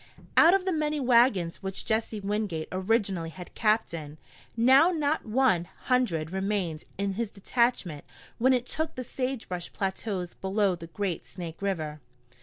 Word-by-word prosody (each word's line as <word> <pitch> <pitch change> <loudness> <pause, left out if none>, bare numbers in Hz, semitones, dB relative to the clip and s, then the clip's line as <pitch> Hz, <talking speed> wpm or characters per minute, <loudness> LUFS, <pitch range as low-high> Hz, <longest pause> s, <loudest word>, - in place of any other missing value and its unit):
Out 340 +3 +8
of 385 -1 0
the 375 - +1
many 305 -1 0
wagons 235 -9 +3
which 190 0 -4
Jesse 220 -1 -1
Wingate 200 -5 -2
originally 190 -3 0
had 180 +2 -10
captained, 170 -9 0 0.4
now 265 +8 +6
not 310 -6 0
one 220 -7 +3
hundred 175 -11 -1
remained 190 -4 -2
in 200 0 -1
his 225 +2 -2
detachment 205 - 0 0.4
when 260 +3 +4
it 250 -1 +2
took 315 +4 -2
the 255 - -4
sagebrush 245 -9 -4
plateaus 190 -2 -3
below 195 0 +1
the 170 -1 -8
great 185 0 -3
Snake 170 -1 -8
River. 160 -6 -2
205 Hz, 145 wpm, -28 LUFS, 175-250 Hz, 0.4 s, Out